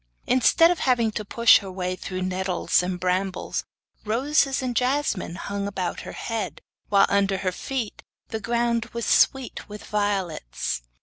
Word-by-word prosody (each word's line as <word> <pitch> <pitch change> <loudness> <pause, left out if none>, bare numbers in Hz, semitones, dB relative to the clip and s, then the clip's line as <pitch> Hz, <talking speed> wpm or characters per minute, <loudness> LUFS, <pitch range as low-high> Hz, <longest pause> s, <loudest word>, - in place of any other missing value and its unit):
Instead 330 +7 +5
of 355 - -1
having 240 -4 +2
to 215 - -4
push 230 +2 +5
her 195 -1 -8
way 185 0 -3
through 185 0 -5
nettles 185 -1 +1
and 180 0 -3
brambles, 185 +1 -1 0.4
roses 270 +4 +1
and 250 -2 -2
jasmine 250 - 0
hung 200 +1 -4
about 185 -3 -3
her - - -8
head, 225 -2 -4 0.3
while 200 -1 +6
under 200 -1 +2
her 185 -1 -1
feet 240 +3 -4 0.3
the 220 - -3
ground 235 +1 0
was 235 -1 -3
sweet 265 -5 +2
with 210 0 -8
violets. 195 - -2
205 Hz, 150 wpm, -25 LUFS, 185-240 Hz, 0.4 s, while